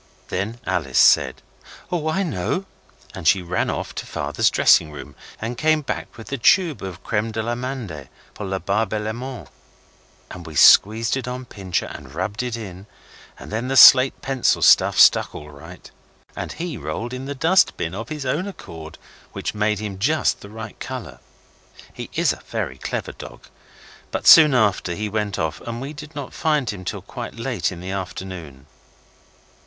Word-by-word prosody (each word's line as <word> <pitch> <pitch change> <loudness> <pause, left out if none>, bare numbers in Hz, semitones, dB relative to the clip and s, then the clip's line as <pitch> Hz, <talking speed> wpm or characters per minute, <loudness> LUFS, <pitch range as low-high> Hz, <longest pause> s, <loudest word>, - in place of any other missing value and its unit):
Then 110 +5 -3
Alice 70 -7 -1
said - - +4 0.5
'Oh, 160 -3 -1
I 190 +5 0
know!' 160 - -2 0.5
and 80 - -4
she 95 -2 +4
ran 90 +1 -1
off - - -4
to - - -6
Father's - - 0
dressing 75 - +4
room, 75 - -10 0.3
and 115 +2 -5
came 155 -1 +2
back - - -5
with 115 - -10
the 140 - -3
tube 165 +4 +3
of 95 -4 -8
creme 110 +1 -1
d'amande 115 - -4 0.2
pour 105 - -6
la 95 0 -2
barbe 105 +2 -1
et - - -1
les 110 +1 -3
mains, 125 0 -7 0.8
and 90 -2 -9
we 80 - -9
squeezed 110 - +6
it 130 -2 -5
on 125 +1 -5
Pincher 95 -6 -3
and 70 -1 -10
rubbed 100 +6 -3
it 125 -2 -3
in, 95 -3 -9 0.5
and - - -11
then 115 +4 -2
the 135 0 0
slate 130 0 +8
pencil 135 -2 +1
stuff - - +5
stuck - - +5
all 75 0 -9
right, 70 - -13 0.4
and - - -5
he 165 -5 -5
rolled 80 - -5
in 130 +1 -6
the 140 +1 -5
dust 165 +7 +3
bin 80 - -3
of 115 +4 -6
his 150 -3 -5
own 150 +9 -1
accord, 80 - -10 0.4
which - - -4
made 105 0 0
him 100 -2 -6
just 155 +9 +1
the 100 - -11
right 110 0 -9
colour. 120 - -7 0.7
He - - -8
is - - +2
a - - -13
very - - -4
clever - - -4
dog, - - -12 0.6
but - - -4
soon 150 -4 +9
after 100 -6 +1
he 105 +2 -3
went 105 -1 -2
off 80 -4 -3
and 115 0 -6
we 140 +4 -6
did 150 +1 -11
not 140 -3 -6
find 150 -7 0
him 95 -3 -9
till - - -5
quite - - -7
late - - -2
in 90 - -9
the 95 +1 -5
afternoon. 90 -7 -7
110 Hz, 180 wpm, -22 LUFS, 95-130 Hz, 0.8 s, soon